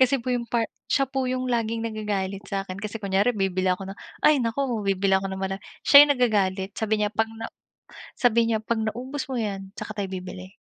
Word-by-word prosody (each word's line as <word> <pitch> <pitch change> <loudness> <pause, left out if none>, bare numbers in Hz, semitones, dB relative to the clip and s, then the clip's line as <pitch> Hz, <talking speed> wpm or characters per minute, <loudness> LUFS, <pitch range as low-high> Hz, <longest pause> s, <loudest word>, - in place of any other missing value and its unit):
Kasi 260 +1 +4
po 250 +2 -4
yung 240 - -1
part 230 -2 +1 0.2
siya 275 -1 +3
po 265 +1 -2
yung 255 0 -1
laging 230 -1 0
nagagalit 205 -3 -3
sa'kin 195 -1 -4
kasi 210 +2 -5
kunyari 200 +5 +2
bibili 190 -2 0
ako 190 +1 -2
ng 195 - -10 0.2
ay, 300 -1 +6
naku 230 +4 0 0.2
bibili 195 0 +1
ako 195 - -4
ng 190 - -5
mara 195 0 -2 0.2
siya 285 0 +10
yung 285 - +4
nagagalit, 200 -6 +1
sabi 215 -1 +1
niya, 210 - +1
"'Pag 225 0 +1
na" 225 - -4 0.8
sabi 235 -1 +4
niya, 225 - +2
"'Pag 220 -1 -1
naubos 260 +5 -5
mo 260 - -2
'yan 195 -3 -3
tsaka 215 - -6
tayo 195 -2 -2
bibili." 185 0 -7
215 Hz, 210 wpm, -25 LUFS, 195-235 Hz, 0.8 s, siya